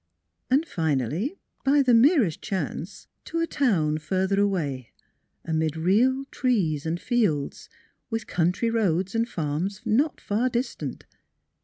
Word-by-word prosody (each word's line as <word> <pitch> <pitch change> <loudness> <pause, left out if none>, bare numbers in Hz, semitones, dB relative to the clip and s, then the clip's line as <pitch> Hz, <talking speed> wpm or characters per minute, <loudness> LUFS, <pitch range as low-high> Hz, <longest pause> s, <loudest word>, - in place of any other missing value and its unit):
And 275 +5 +3
finally, 160 - -1 0.3
by 280 +1 +4
the 250 -2 +4
merest 235 - +4
chance 195 -3 -4 0.2
to 330 - -3
a 330 - +2
town 165 - +1
further 190 +6 0
away, 145 - -1 0.6
amid 160 -1 -1
real 240 +11 +2
trees 170 - 0
and 165 +2 -1
fields, 205 - -1 0.4
with 225 -1 -3
country 180 +7 0
roads 195 -4 +1
and 230 +1 0
farms 170 +6 -3
not 275 +7 +1
far 225 +5 0
distant. 245 +2 -4
195 Hz, 125 wpm, -25 LUFS, 160-245 Hz, 0.6 s, by